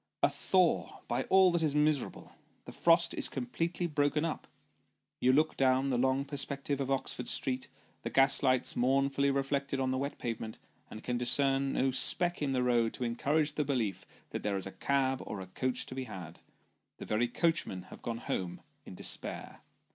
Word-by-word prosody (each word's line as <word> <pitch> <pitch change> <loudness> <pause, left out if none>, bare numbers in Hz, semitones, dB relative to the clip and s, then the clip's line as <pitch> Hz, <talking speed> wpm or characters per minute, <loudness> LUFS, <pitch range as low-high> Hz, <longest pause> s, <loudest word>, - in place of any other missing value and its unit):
A - - +6
thaw, 185 -3 +1
by - - -1
all 190 -1 +5
that 170 -1 +1
is 150 -3 +1
miserable! 150 -2 0 0.3
The - - -8
frost 170 0 +3
is - - +2
completely 165 +8 -2
broken 150 -1 +1
up. 160 - -4 0.7
You 125 - +4
look 155 +4 +2
down 130 0 +2
the 125 - +1
long 130 +2 +1
perspective 140 0 -1
of 135 - -2
Oxford 130 -2 -2
street, 130 -1 -1 0.3
the - - -4
gas 135 +1 +5
lights 130 -2 +2
mournfully 140 +2 +2
reflected 140 0 -1
on 130 -1 0
the 130 - -1
wet 140 +1 -3
pavement, 115 -2 -5 0.3
and 110 - -9
can 120 -1 -2
discern 135 +2 +2
no 135 0 +1
speck 175 +7 +1
in 145 -2 0
the 130 -1 +1
road 120 -2 +2
to - - -4
encourage 145 +6 0
the 150 - 0
belief 115 -10 -2 0.2
that - - -4
there 100 -1 -1
is 95 - -1
a 95 - -6
cab 135 +1 0
or 105 - -6
a 95 - -6
coach 125 +7 -2
to - - -8
be 130 0 -4
had 90 -7 -9 0.6
the - - -8
very 110 +3 +1
coachmen 140 - 0
have - - -12
gone 115 -1 -3
home 90 -6 -4 0.3
in - - -9
despair. - - -4
135 Hz, 185 wpm, -31 LUFS, 125-145 Hz, 0.7 s, A